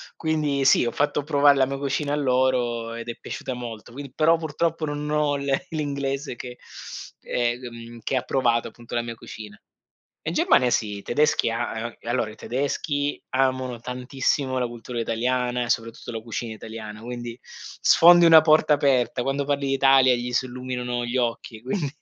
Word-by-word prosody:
Quindi 150 -4 0
sì, 125 - +5
ho - - -1
fatto 145 0 0
provare 145 -1 +4
la 130 - +3
mia 140 +1 -3
cucina 145 +1 -1
a - - +2
loro 125 -4 +1
ed 115 0 -7
è 115 - -4
piaciuta 130 - -5
molto. 120 -2 -8
Quindi, 140 +1 -8
però 160 +4 +3
purtroppo 160 +1 -1
non 145 0 -4
ho 150 -1 +2
le 140 -1 -1
l'inglese 140 -3 -3
che, 125 0 -8 0.6
ehm, 120 -1 -3
che 135 - -2
ha 125 - +1
provato 120 -3 +1
appunto 120 +1 -10
la 120 - +1
mia 115 0 -5
cucina. 110 -2 -10 0.7
In - - -1
Germania 125 -1 +3
sì, 105 -3 0
i - - -8
tedeschi 145 -2 +2
a 115 0 -3
allora, 120 -2 -1
i 110 - -13
tedeschi 145 +3 -2
amano 130 -2 0
tantissimo 130 +2 -1
la 125 - +1
cultura 120 0 -6
italiana 125 +2 0
e - - -8
soprattutto 115 -1 -2
la 115 - -4
cucina 115 +1 -5
italiana, 110 -1 -8
quindi 120 0 -6
sfondi 175 +1 +4
una 165 -1 +9
porta 155 -1 +4
aperta, 130 -4 +2
quando 135 +2 -1
parli 140 -1 -1
d'Italia 135 -1 +5
gli 120 +1 -4
si 130 - +1
illuminano 125 -1 -4
gli 120 +1 -4
occhi 115 -2 -2
quindi, 145 +4 -2
125 Hz, 170 wpm, -24 LUFS, 120-140 Hz, 0.7 s, una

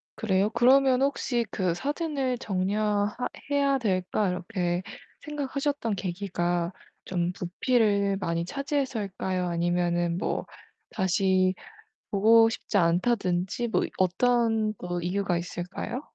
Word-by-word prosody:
그래요? 195 -1 +1
그러면 255 +2 +4
혹시 250 -4 0
그 185 -4 0
'사진을 275 - -2
정리 200 -1 -1 0.4
하 250 - -1 0.2
해야 280 -1 +3
될까.' 195 -3 0
이렇게 180 -1 -2 0.4
생각하셨던 285 -5 -2
계기가 175 -2 -2 0.3
좀 175 -1 -1
부피를 200 +2 +1
많이 170 -2 -1
차지해서일까요, 215 -9 -2
아니면은 175 0 0
뭐 - - -2 0.4
다시 185 0 +2 0.6
보고 225 +3 +6
싶지 225 - -2
않다든지 185 +4 +1
뭐 - - +2 0.2
어떤 225 +3 +2
그 175 0 -4
이유가 180 +1 0
있을까요? 175 +8 -5
195 Hz, 255 characters per minute, -27 LUFS, 180-245 Hz, 0.6 s, 보고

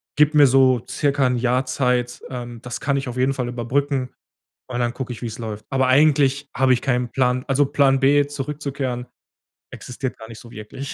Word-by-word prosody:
gebe 150 +1 +3
mir 145 -2 +8
so 130 -2 +3
circa 140 +1 0
'n 125 - 0
Jahr 125 +2 +1
Zeit.“ 125 -2 -1
Ähm, 120 -2 -7
das 125 -1 -6
kann 140 -1 0
ich 135 -2 -2
auf 120 - -7
jeden 130 +2 +2
Fall 125 -2 -3
überbrücken 130 +2 -2 0.5
und 120 -1 -4
dann 120 -1 0
gucke 125 0 -5
ich, 115 - -11
wie's 115 -2 -5
läuft. 110 -2 -6
Aber 130 -1 +1
eigentlich 140 0 +3
habe 130 -1 +4
ich 125 - 0
keinen 125 -3 0
Plan 125 0 0
also, 140 +1 +2
Plan 135 -1 +2
B 145 +1 +4
zurückzukehren 140 -3 -4 0.7
existiert 125 +1 -6
gar 110 - -11
nicht 115 -2 -10
so 120 - -13
wirklich. 120 +6 -8
130 Hz, 200 wpm, -21 LUFS, 120-140 Hz, 0.7 s, mir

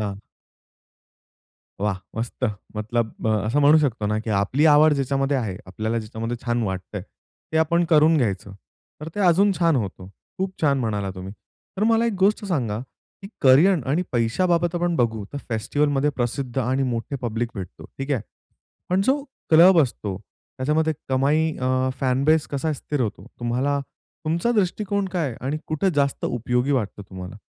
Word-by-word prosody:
हां. 100 -2 -3 1.6
वाह! 100 -2 0 0.2
मस्त! 115 +3 -3 0.3
मतलब 110 +1 -2
अ, - - +3 0.2
असं 135 +7 +1
म्हणू 150 +2 +6
शकतो 125 -8 0
ना, 105 +1 0
की 110 +1 -4
आपली 105 +9 +1
आवड 150 0 +6
ज्याच्यामध्ये 135 0 0
आहे, 110 -7 -2
आपल्याला 110 +5 -2
ज्याच्यामध्ये 115 +2 -4
छान 120 -1 0
वाटतंय, 95 -2 -4 0.5
ते - - +1
आपण 170 +2 +3
करून 155 +1 +5
घ्यायचं. 100 -7 -1 0.5
तर 155 - -6
ते 205 - -3
अजून 195 +2 +4
छान 165 -3 +3
होतं. 95 -5 -4 0.3
खूप 190 0 -1
छान 140 -2 +3
म्हणाला 105 -5 -2
तुम्ही. 95 +1 -7 0.4
तर 205 - +1
मला 230 +1 +3
एक 230 - 0
गोष्ट 205 +2 +2
सांगा, 125 - -1 0.4
की 195 - -8
करियर 155 +8 +6
आणि 155 +6 +2
पैशाबाबत 170 +9 +1
आपण 175 0 0
बघू, 110 -5 0
तर 145 - -4
फेस्टिव्हलमध्ये 140 +6 +1
प्रसिद्ध 125 +1 -2
आणि 130 +2 +1
मोठे 125 +1 -2
पब्लिक 115 0 -1
भेटतो, 95 -4 -8
ठीक 135 +2 -4
आहे? 130 - 0 0.7
पण 185 +1 +3
जो 275 +4 +2 0.3
क्लब 170 +3 +7
असतो, 105 -7 -3 0.4
त्याच्यामध्ये 155 +4 +1 0.2
कमाई 145 +5 +2
अ, 130 0 +1
फॅन 130 +1 +1
बेस 155 0 +3
कसा 150 +2 -1
स्थिर 145 0 -4
होतो? 105 -3 -3
तुम्हाला 125 +4 0 0.5
तुमचा 170 +9 +1
दृष्टिकोन 200 -1 0
काय 175 -4 -1
आहे, 115 - -7
आणि 145 +3 -1
कुठे 160 +5 0
जास्त 140 -1 0
उपयोगी 125 +3 0
वाटतं 105 -5 -2
तुम्हाला? 95 +1 -8
135 Hz, 160 wpm, -23 LUFS, 115-160 Hz, 1.6 s, क्लब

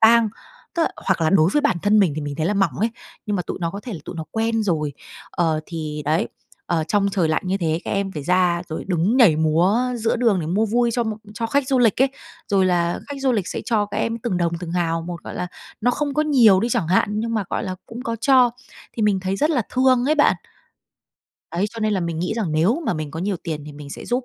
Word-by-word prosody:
tang. 230 0 +6 0.5
Tức 340 - +2
là - - +1 0.2
hoặc 190 -3 +2
là 160 -1 +2
đối 175 -3 +4
với 295 - +3
bản - - +2
thân 210 +1 +4
mình 185 -7 +4
thì - - -2
mình 145 -1 -4
thấy 160 - 0
là 205 - +1
mỏng 195 -6 +2
ấy, 225 - +2 0.4
nhưng 210 -1 0
mà 180 - -1
tụi - - -5
nó 170 -1 -1
có 200 +4 -6
thể 240 - -7
là 170 - -5
tụi - - -7
nó 160 - -4
quen 225 0 0
rồi. 155 -7 0 0.4
Ờ, 160 -3 0
thì 155 -3 -5
đấy, 160 +9 +1 0.4
ờ, 165 -2 0
trong 200 +3 +2
trời 185 -5 +1
lạnh 155 - +1
như 190 +1 +1
thế, 165 -2 0
các - - -4
em 195 -1 -1
phải 150 - -5
ra 180 +1 +2
rồi 160 - -5
đứng 185 +6 +1
nhảy 210 -12 +6
múa 165 +7 +3 0.2
giữa 230 0 0
đường 225 -6 +2
để 155 - -4
mua 200 +7 +1
vui 235 +2 +2
cho 240 - +1
một 220 -1 -3 0.2
cho 230 +1 -2
khách 275 +3 0
du 265 - +3
lịch 240 0 +4
ấy, 270 - +4 0.4
rồi 195 -2 +3
là 175 -1 +1
khách 285 - -5
du 270 -1 +2
lịch 205 -6 -1
sẽ - - -3
cho 215 -3 +1
các 200 - -6
em 230 0 -1
từng 220 -5 -2
đồng, 170 -1 0
từng 170 -2 -5
hào 165 -2 0
một. 170 0 -7
Gọi - - -7
là, 180 - -3 0.3
nó 245 - +3
không 285 +2 -2
có 305 - +2
nhiều 240 -11 +5
đi 235 - 0
chẳng 220 -9 0
hạn, 185 - +3
nhưng 230 +2 -2
mà, 215 -3 0
gọi - - -1
là, 185 - -3
cũng 235 +2 -8
có 230 -2 -3
cho. 255 -1 +5 0.4
Thì 225 - -3
mình 205 -3 +2
thấy 190 +1 -2
rất 300 +7 +2
là 260 -8 +2
thương 255 -1 +4
ấy 305 - +4
bạn. 295 - +4 1.2
Đấy, 175 +3 0
cho 230 -1 -8
nên 215 -1 +1
là 190 - 0
mình 170 -2 -3
nghĩ 180 +4 -1
rằng 210 -9 -2
nếu 190 - +2
mà 220 - +1
mình 155 -2 -4
có 160 - -6
nhiều 195 0 -1
tiền 155 -4 -4
thì 150 - -8
mình 145 0 -10
sẽ - - -8
giúp 245 +1 -1
195 Hz, 275 wpm, -22 LUFS, 170-230 Hz, 1.2 s, tang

